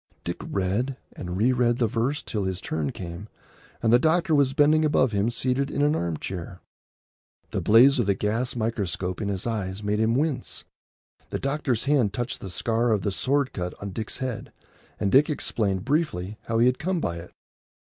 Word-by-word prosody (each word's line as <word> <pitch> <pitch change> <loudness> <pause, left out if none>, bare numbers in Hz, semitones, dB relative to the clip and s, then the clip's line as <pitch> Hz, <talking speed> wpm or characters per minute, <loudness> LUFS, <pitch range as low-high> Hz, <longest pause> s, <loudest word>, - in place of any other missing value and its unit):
Dick 85 - -3
read 105 +8 -1 0.2
and 90 0 -5
re 115 +6 +3
read 120 -1 +2
the 120 - +2
verse 120 +6 -1
till 105 -4 -2
his 95 -1 -2
turn 80 -5 -2
came, 90 +3 -8 0.5
and 115 - +4
the 120 - +7
doctor 160 +2 +2
was 140 -3 +3
bending 155 +2 +5
above 140 -5 +3
him 100 +2 +1
seated 130 +3 0
in 145 - 0
an 150 +1 +3
arm 85 - -1
chair. 90 +1 -6 0.9
The - - -1
blaze 125 +5 +6
of 115 - +1
the 100 - +3
gas 115 +6 -1
microscope 100 -5 -2
in 105 - -2
his 100 -2 -3
eyes 105 -3 -3
made 105 +1 0
him 110 +1 +2
wince. 145 0 -1 0.6
The - - -2
doctor's 135 -4 -1
hand 135 -8 +2
touched 120 +3 -3
the 95 - -6
scar 115 +6 0
of 105 -3 +1
the 100 - 0
sword 135 - 0
cut 90 -1 -4
on 100 -1 -5
Dick's 110 +3 -4
head, 130 -4 -4 0.5
and 100 - 0
Dick 140 +4 +5
explained 105 -9 -1
briefly 120 - -1
how 115 - -1
he 115 - +5
had 125 0 +2
come 185 +1 -1
by 85 - -2
it. 85 +1 -9
115 Hz, 195 wpm, -25 LUFS, 95-135 Hz, 0.9 s, the